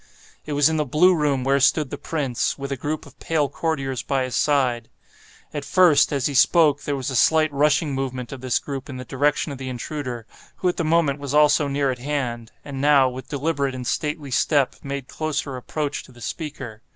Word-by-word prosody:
It 150 - -3
was 145 0 +4
in 160 0 0
the 150 - +2
blue 155 +7 +4
room 145 -5 +1
where 135 +1 +2
stood 140 +1 +2
the - - -3
prince, 140 -7 -2
with 140 0 -6
a - - 0
group 150 +4 -4
of - - -17
pale 155 -3 0
courtiers 140 -3 -2
by 135 -2 -1
his 130 -1 -4
side. 125 -6 +1 0.6
At 145 -2 -4
first, 150 -1 +4
as 140 -3 -1
he 145 - 0
spoke, 145 +1 +4
there 145 - -2
was 135 0 -3
a - - -3
slight 155 +3 +3
rushing 145 +1 +2
movement 130 -2 -4
of 135 -2 -8
this 130 -2 +1
group 135 -2 -6
in 130 - -6
the 125 - -7
direction 145 +4 0
of 135 - -7
the 130 -1 -5
intruder, 125 -2 -5 0.3
who 185 - 0
at 175 - -3
the 170 - 0
moment 155 -3 +2
was 140 0 -3
also 150 0 +4
near 140 -1 0
at 125 - -6
hand, 120 -5 -3
and 135 -2 -5
now, 140 -2 +5
with 130 +1 -9
deliberate 140 -2 -1
and 125 -1 -6
stately 150 +1 -2
step, 140 +1 +2
made 140 -2 -5
closer 150 -3 -3
approach 145 +3 -3
to - - -17
the 120 - -17
speaker. 130 -5 -6
140 Hz, 215 wpm, -23 LUFS, 130-150 Hz, 0.6 s, now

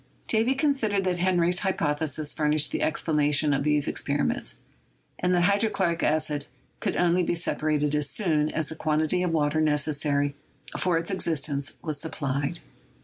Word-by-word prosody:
Davy 230 +4 +2
considered 265 -9 +1
that 180 -1 -1
Henry's 175 -1 +2
hypothe 160 -5 -1
sis 150 +2 0
furnished 150 -1 +1
the - - -2
explanation 150 -1 +1
of 140 0 0
these 150 -1 +1
experiments, - - -1 0.6
and 180 - 0
that 175 - +2
hydrochloric 200 -3 +1
acid 150 -1 0 0.3
could - - -2
only 175 +1 +2
be 175 - 0
separated 150 -3 -1
as 150 -1 +3
soon 155 -6 +2
as 155 -1 -1
the 160 - -6
quantity 155 +3 0
of 180 - 0
water 155 -1 +1
necessary 145 -1 +1 0.4
for 180 -2 +1
its 165 +4 -2
existence 145 -6 0
was 150 -3 -3
sup 160 - -6
plied. 140 +3 -2
155 Hz, 155 wpm, -26 LUFS, 150-180 Hz, 0.6 s, as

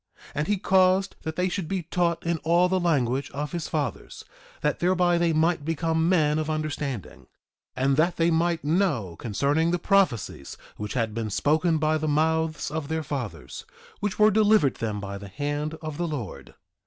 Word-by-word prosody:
And 150 +2 -2
he 205 - +1
caused 190 0 +3
that 160 0 -5
they 180 0 +1
should 185 -2 -3
be 190 -1 -2
taught 170 0 -1
in 170 -1 0
all 170 +3 +3
the 185 +1 +1
language 140 -6 +1
of 145 +1 -3
his 170 -3 -3
fathers, 145 -7 -4 0.4
that 150 -1 0
thereby 175 0 +2
they 170 -1 +2
might 160 0 +1
become 160 +1 0
men 155 -4 +3
of 155 0 -2
understanding; 150 - -4 0.5
and 135 +1 +1
that 170 +3 +2
they 165 0 +3
might 165 0 +1
know 145 - 0
concerning 140 - 0
the 175 - +1
prophecies 175 - 0 0.2
which 105 0 -5
had 115 -3 0
been 110 -1 -3
spoken 155 - +2
by 155 0 +1
the 155 - -2
mouths 160 +1 0
of 155 -2 -3
their 160 +1 -2
fathers, 120 - -5 0.4
which 205 -2 -2
were 215 0 +6
delivered 210 - +4
them 105 -2 -3
by 100 0 -6
the 100 - -9
hand 145 +8 -3
of 155 -2 -5
the 175 - -1
Lord. 135 - -6
155 Hz, 180 wpm, -26 LUFS, 140-175 Hz, 0.5 s, were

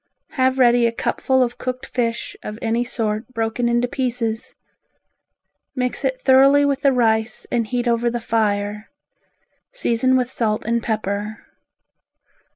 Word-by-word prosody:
Have 260 -1 +1
ready 240 -2 +5
a - - 0
cupful 260 +2 +1
of 245 0 -4
cooked 255 0 -4
fish 235 -2 -2
of 210 - -7
any 230 +1 0
sort 220 -2 -2
broken 225 +2 0
into 240 +1 +1
pieces. 240 -3 -3 1.2
Mix 250 +1 -2
it 260 -1 -1
thoroughly 275 +2 +5
with 280 -1 0
the 275 -1 +4
rice 220 -3 +1
and 235 -2 0
heat 245 +1 -2
over 235 0 +2
the 240 0 -3
fire; 210 -2 -1 0.8
season 260 - +1
with 250 0 -1
salt 215 -2 -1
and 235 +1 0
pepper. 215 -1 -3
235 Hz, 140 wpm, -21 LUFS, 225-255 Hz, 1.2 s, ready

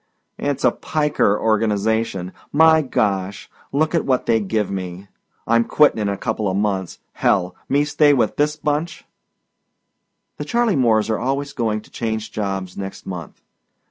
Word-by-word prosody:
"It's 140 -1 -2
a - - +5
piker 150 -9 0
organization. 110 -3 0 0.2
My 160 +1 +6
Gosh! 100 -7 -1 0.2
Lookit 155 +3 +1
what 130 -2 0
they 115 -1 +3
give 105 0 -1
me. 95 0 -6 0.4
I'm 115 +1 +3
quittin' 150 -1 +3
in 105 -1 0
a 100 - -2
coupla 105 -3 -2
months. 95 -3 -1 0.2
Hell! 90 0 +1
Me 145 +2 +3
stay 145 0 +4
with 120 -7 +2
this 150 +1 +1
bunch!" 150 +2 -2 1.3
The - - -4
Charley 235 -4 +1
Moores 115 -4 +2
are 110 - 0
always 140 +3 -2
going 110 -3 -1
to - - -20
change 110 -1 -3
jobs 95 -4 -3
next 95 -1 -7
month. 85 -5 -8
110 Hz, 145 wpm, -21 LUFS, 100-145 Hz, 1.3 s, My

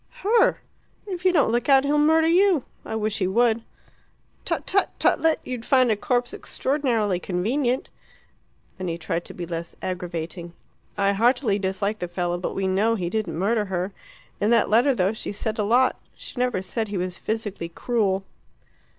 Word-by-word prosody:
Her. 440 +3 +3 0.4
If 370 -3 -6
you 370 - +6
don't 300 -9 +3
look 240 +5 0
out 270 -1 +6
he'll 295 +1 +2
murder 320 +2 +4
you. 350 -3 +4 0.2
I - - -5
wish 215 -1 -1
he 185 - +1
would." 230 +3 +2 0.8
"Tut - - -2
tut, 395 0 +2
tutlet! 325 -1 +3
You'd 250 -3 -5
find 255 -3 +4
a - - +3
corpse 245 +3 -1
extraordinarily 240 -9 0
inconvenient." 240 +9 -1 0.9
Then 185 - -3
he 165 -1 -2
tried 170 0 -3
to - - -9
be 175 - -5
less 170 0 -6
aggravating. 175 -1 -5 0.4
"I 200 0 +2
heartily 230 0 +2
dislike 200 +2 -1
the 180 - -3
fellow, 175 0 -2
but 180 - -4
we 195 - -1
know 205 +5 +2
he 175 -4 -3
didn't 215 -6 -2
murder 210 +4 +1
her. 185 0 -2 0.5
In 205 - +1
that 230 -2 +3
letter, 245 +5 +4
though 190 0 +1
she 220 - -5
said 215 +2 -3
a - - +2
lot, 245 +5 +2 0.2
she - - -9
never 250 -7 0
said 220 +3 -3
he 205 -1 -4
was 180 0 -3
physically 215 -6 -3
cruel." 195 0 0
215 Hz, 175 wpm, -24 LUFS, 185-250 Hz, 0.9 s, you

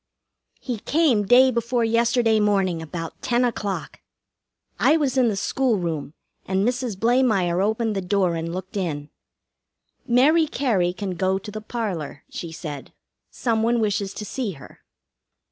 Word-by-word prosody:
He 245 -4 -4
came 260 -8 +2
day 255 +3 +6
before 235 0 0
yesterday 230 0 +2
morning 195 -5 +1
about 165 +1 -7
ten 245 0 +2
o'clock. 205 -5 -3 0.8
I 310 - +5
was 275 -4 0
in 255 -2 +4
the 215 - 0
school 250 +3 +1
room, 160 -4 -4 0.3
and 190 +3 0
Mrs. 245 -4 -2
Blamire 220 -6 +2
opened 220 +1 0
the 195 - -1
door 185 -1 +1
and 165 0 -3
looked 185 +2 -6
in. 155 -7 -3 1.0
"Mary 300 +7 +4
Cary 220 -12 +1
can 190 +1 -5
go 185 +2 0
to 210 +2 -8
the 215 +1 -6
parlor," 195 - -4
she 170 - -6
said. 150 -5 -7 0.4
"Some 230 -3 -1
one 235 +1 +2
wishes 205 -2 -1
to 210 - -5
see 225 -2 -3
her." 140 -4 -14
210 Hz, 150 wpm, -23 LUFS, 185-240 Hz, 1.0 s, day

